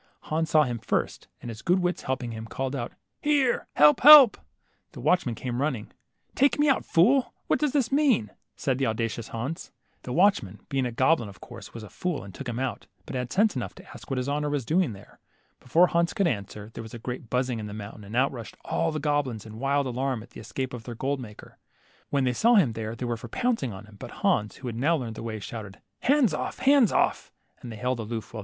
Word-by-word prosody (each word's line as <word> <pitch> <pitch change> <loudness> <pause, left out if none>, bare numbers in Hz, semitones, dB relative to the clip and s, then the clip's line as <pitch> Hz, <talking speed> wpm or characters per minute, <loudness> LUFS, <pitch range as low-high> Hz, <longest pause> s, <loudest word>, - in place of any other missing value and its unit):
Hans 160 +1 -2
saw 155 -1 +5
him 120 -4 -3
first, - - -2 0.2
and 120 - -6
his 110 +1 -9
good 180 +2 +2
wits 180 -1 -1
helping 130 -2 -3
him, 110 0 -7
called 135 +3 -3
out, 120 -3 -4 0.3
Here! 285 -4 +2
help, 150 0 +6
help! 290 -4 +10 0.3
" - - -44
The - - -10
watchman 155 -10 +1
came 125 +2 -3
running. 135 -8 -2 0.2
'' - - -47
Take 280 +2 +3
me 295 +1 +3
out, 275 - +3
fool; 245 +11 +3
what - - +1
does 300 -2 +1
this 275 -4 +1
mean? 270 - +2
" - - -54
said 130 -2 -1
the 135 - +1
auda 115 +1 0
cious 115 0 -6
Hans. 130 +8 -5 0.3
The 125 - -7
watchman, 125 - +2
being 135 -2 0
a - - -5
goblin, 130 -1 +2
of 95 -3 -14
course - - -11
was 115 - -7
a - - -8
fool 180 -4 -3
arid 100 -1 -11
took 130 +5 -6
him 120 - -4
out, 130 -5 -3 0.2
but - - -7
had 125 -1 -3
sense 210 +2 +3
enough - - -4
to 190 +1 -14
ask - - -12
what 135 - -1
his 125 +1 -2
honor 150 +1 -1
was 145 -4 -2
doing 165 - +1
there. 100 0 -15 0.4
Before 165 +8 +4
Hans 170 -1 0
could 195 - +2
answer, 105 - -3
there - - -6
was 110 +1 -9
a - - -5
great 125 0 -6
buzzing 125 -1 0
in 105 - -5
the - - -7
moun 105 0 -8
tain, 105 - -12
and 105 +3 -8
out 130 +3 +3
rushed 120 -5 -9
all 165 0 0
the 155 - -3
goblins 145 -7 -1
in 110 0 -10
wild 140 +1 +1
alarm 130 -2 -2
at - - -17
the - - -11
escape 130 +3 -4
of 120 -2 -7
their 120 - -6
gold 135 +4 -2
maker. 105 -5 -11 0.5
When 140 -2 +1
they 125 -1 +1
saw 235 - +4
him 155 - +4
they 110 -1 -4
were 120 -1 -2
for - - -9
pouncing 240 - -1
upon 100 0 -9
him, 105 -1 -16
but - - -8 0.2
Hans, 105 0 +2
who 130 - -8
had 115 -2 -4
now 150 +7 +2
learned 120 -5 -5
the - - -8
way, 110 -1 -4
shouted, 105 -1 -8 0.2
Hands 265 - +3
off, 150 - -3
hands 270 -6 +4
off - - +1
130 Hz, 240 wpm, -26 LUFS, 115-170 Hz, 0.5 s, help